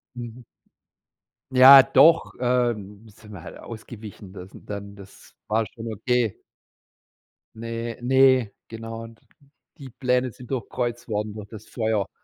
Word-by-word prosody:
Mhm. 120 Hz, 0 st, -9 dB, 1.1 s
Ja, 130 Hz, +1 st, +10 dB
doch, 140 Hz, +5 st, +4 dB
ähm, 115 Hz, -4 st, -1 dB
sind 105 Hz, 0 st, -16 dB
wir 95 Hz, -5 st, -10 dB
halt -, -, -11 dB
ausgewichen, 110 Hz, -4 st, -11 dB
das 95 Hz, 0 st, -11 dB
n -, -, -15 dB
dann 100 Hz, 0 st, -7 dB
das 100 Hz, 0 st, -16 dB
war 110 Hz, +1 st, +1 dB
schon 115 Hz, -1 st, -8 dB
okay. 120 Hz, 0 st, -1 dB, 1.2 s
Ne, 115 Hz, 0 st, -5 dB
ne, 130 Hz, -3 st, +4 dB, 0.2 s
genau. 115 Hz, 0 st, -8 dB
D 115 Hz, -, -16 dB, 0.6 s
die 135 Hz, -3 st, -10 dB
Pläne 125 Hz, +1 st, -1 dB
sind 125 Hz, +3 st, -14 dB
durchkreuzt 120 Hz, -2 st, -4 dB
worden 105 Hz, -1 st, -3 dB
durch 105 Hz, -1 st, -9 dB
das 110 Hz, 0 st, -12 dB
Feuer. 110 Hz, -4 st, -2 dB
115 Hz, 130 wpm, -24 LUFS, 105-125 Hz, 1.2 s, Ja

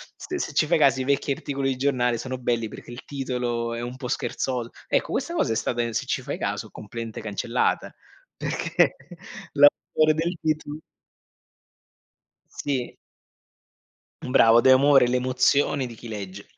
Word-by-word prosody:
st 365 Hz, -, -6 dB
se 150 Hz, -, -3 dB
ci 150 Hz, +2 st, +2 dB
fai 170 Hz, -, +3 dB
caso 135 Hz, -4 st, +4 dB
i 130 Hz, -, -3 dB
vecchi 140 Hz, 0 st, +1 dB
articoli 135 Hz, 0 st, -2 dB
di 130 Hz, -, 0 dB
giornale 125 Hz, -3 st, +1 dB
sono 130 Hz, 0 st, -4 dB
belli 120 Hz, -2 st, -1 dB
perché 115 Hz, -, -11 dB
il 120 Hz, -, -9 dB
titolo 125 Hz, -4 st, -3 dB
è 115 Hz, -, -4 dB
un 120 Hz, +1 st, -5 dB
po' 130 Hz, -2 st, -6 dB
scherzol 125 Hz, -2 st, -2 dB, 0.2 s
ecco -, -, 0 dB
questa 340 Hz, -, -2 dB
cosa 120 Hz, -, +1 dB
è -, -, -2 dB
stata, 120 Hz, +1 st, -1 dB
se -, -, -2 dB
ci -, -, -1 dB
fai -, -, -5 dB
caso, -, -, -3 dB
completamente 115 Hz, +1 st, -7 dB
cancellata, 105 Hz, -3 st, -1 dB, 0.5 s
perché -, -, +1 dB, 0.6 s
l'autore 155 Hz, +2 st, +4 dB
del 170 Hz, +3 st, -1 dB
titolo 155 Hz, -1 st, -2 dB, 1.7 s
Sì. 135 Hz, -4 st, -3 dB, 1.3 s
Mh, 125 Hz, -, -5 dB
bravo, 115 Hz, -2 st, +6 dB
de 130 Hz, -, +6 dB
amore 135 Hz, -1 st, +6 dB
le 125 Hz, +1 st, +1 dB
emozioni 130 Hz, +1 st, +2 dB
di 115 Hz, -, -10 dB
chi 120 Hz, -, -11 dB
legge. 100 Hz, -2 st, -7 dB
130 Hz, 160 wpm, -25 LUFS, 120-140 Hz, 1.7 s, bravo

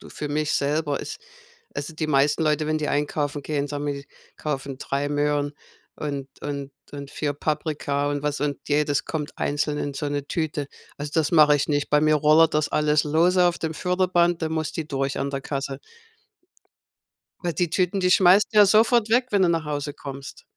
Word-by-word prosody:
so -, -, -13 dB
für 150 Hz, -, -5 dB
mich 150 Hz, 0 st, -1 dB
selber, 145 Hz, 0 st, 0 dB
ist 435 Hz, -, -7 dB, 0.6 s
also 155 Hz, +3 st, -5 dB
die 155 Hz, 0 st, -2 dB
meisten 145 Hz, +2 st, +2 dB
Leute, 155 Hz, 0 st, +1 dB
wenn 155 Hz, 0 st, +1 dB
die 150 Hz, -, -2 dB
einkaufen 145 Hz, 0 st, -1 dB
gehen, 145 Hz, -1 st, -2 dB
sagen 145 Hz, 0 st, -4 dB
wir 145 Hz, -, -1 dB
die 140 Hz, 0 st, -9 dB, 0.3 s
kaufen 140 Hz, -3 st, -4 dB
3 140 Hz, +1 st, -2 dB
Möhren 145 Hz, 0 st, 0 dB, 0.4 s
und 140 Hz, -2 st, -4 dB
und 140 Hz, -1 st, -5 dB, 0.2 s
und 140 Hz, -1 st, -8 dB
4 145 Hz, -2 st, -2 dB
Paprika 145 Hz, -1 st, -1 dB
und 145 Hz, -1 st, -2 dB
was 150 Hz, -1 st, -2 dB
und 145 Hz, -1 st, -1 dB
jedes 150 Hz, 0 st, +1 dB
kommt 155 Hz, -1 st, -5 dB
einzeln 145 Hz, +1 st, -1 dB
in 145 Hz, -, -3 dB
so 145 Hz, +1 st, -3 dB
'ne 145 Hz, -1 st, -3 dB
Tüte. 155 Hz, -3 st, -2 dB, 0.3 s
Also 145 Hz, 0 st, -5 dB
das 160 Hz, -1 st, +1 dB
mache 150 Hz, -2 st, +6 dB
ich 140 Hz, -, -2 dB
nicht. 145 Hz, -1 st, 0 dB
Bei 150 Hz, -, +4 dB
mir 155 Hz, 0 st, +4 dB
rollert 155 Hz, +2 st, +5 dB
das 150 Hz, 0 st, +1 dB
alles 150 Hz, 0 st, +2 dB
lose 175 Hz, +4 st, +3 dB
auf 175 Hz, -, +1 dB
dem 160 Hz, -1 st, -3 dB
Förderband, 175 Hz, 0 st, +1 dB
da 160 Hz, -, -1 dB
muss 160 Hz, -1 st, -2 dB
die 160 Hz, -, -4 dB
durch 135 Hz, -2 st, -2 dB
an 140 Hz, +1 st, -2 dB
der 135 Hz, -1 st, -3 dB
Kasse. 135 Hz, -1 st, -4 dB, 1.6 s
Weil 175 Hz, -2 st, -2 dB
die 175 Hz, +1 st, 0 dB
Tüten, 185 Hz, +2 st, 0 dB
die 180 Hz, -1 st, +2 dB
schmeißt 185 Hz, +2 st, +6 dB
du 215 Hz, -, +3 dB
ja 205 Hz, -, +9 dB
sofort 225 Hz, +2 st, +4 dB
weg, 245 Hz, +3 st, +2 dB
wenn 200 Hz, -2 st, +3 dB
du 180 Hz, -, +4 dB
nach 165 Hz, -1 st, 0 dB
Hause 145 Hz, -1 st, -3 dB
kommst. 140 Hz, -2 st, -9 dB
150 Hz, 200 wpm, -24 LUFS, 145-160 Hz, 1.6 s, ja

